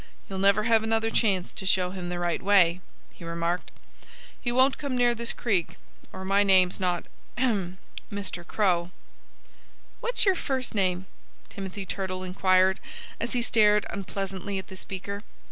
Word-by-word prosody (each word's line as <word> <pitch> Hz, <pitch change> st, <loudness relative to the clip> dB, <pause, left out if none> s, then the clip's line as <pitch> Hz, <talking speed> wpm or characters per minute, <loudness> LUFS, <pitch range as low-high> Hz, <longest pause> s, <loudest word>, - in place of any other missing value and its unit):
"You'll 190 Hz, -1 st, -5 dB
never 200 Hz, +2 st, +4 dB
have 225 Hz, 0 st, +4 dB
another 225 Hz, 0 st, 0 dB
chance 195 Hz, -7 st, +1 dB
to -, -, -2 dB
show 185 Hz, -1 st, +2 dB
him 180 Hz, -2 st, -5 dB
the 175 Hz, -, -3 dB
right 175 Hz, -1 st, -1 dB
way," 185 Hz, -3 st, +4 dB, 0.3 s
he -, -, -13 dB
remarked. 170 Hz, +1 st, -2 dB, 0.7 s
"He 240 Hz, -, -1 dB
won't 260 Hz, +2 st, +3 dB
come 280 Hz, -4 st, -2 dB
near 240 Hz, -1 st, +4 dB
this 235 Hz, 0 st, -1 dB
creek, 195 Hz, -8 st, -1 dB, 0.3 s
or 190 Hz, 0 st, -7 dB
my 195 Hz, +1 st, +3 dB
name's 190 Hz, -2 st, +4 dB
not 180 Hz, -2 st, 0 dB, 0.3 s
ahem 200 Hz, -8 st, 0 dB, 0.3 s
Mr. 200 Hz, -3 st, -4 dB
Crow." 175 Hz, -2 st, +1 dB, 1.1 s
"What's 485 Hz, -1 st, +1 dB
your 385 Hz, -, +5 dB
first 265 Hz, -7 st, -2 dB
name?" 185 Hz, -3 st, 0 dB, 0.4 s
Timothy 195 Hz, 0 st, -6 dB
Turtle 185 Hz, -1 st, -3 dB
inquired, 185 Hz, 0 st, +3 dB, 0.4 s
as 235 Hz, -, -2 dB
he 245 Hz, -1 st, +1 dB
stared 210 Hz, -2 st, +4 dB
unpleasantly 195 Hz, -1 st, -4 dB
at 190 Hz, -, -6 dB
the 190 Hz, -, -9 dB
speaker. 195 Hz, +2 st, -5 dB
195 Hz, 155 wpm, -27 LUFS, 185-220 Hz, 1.1 s, your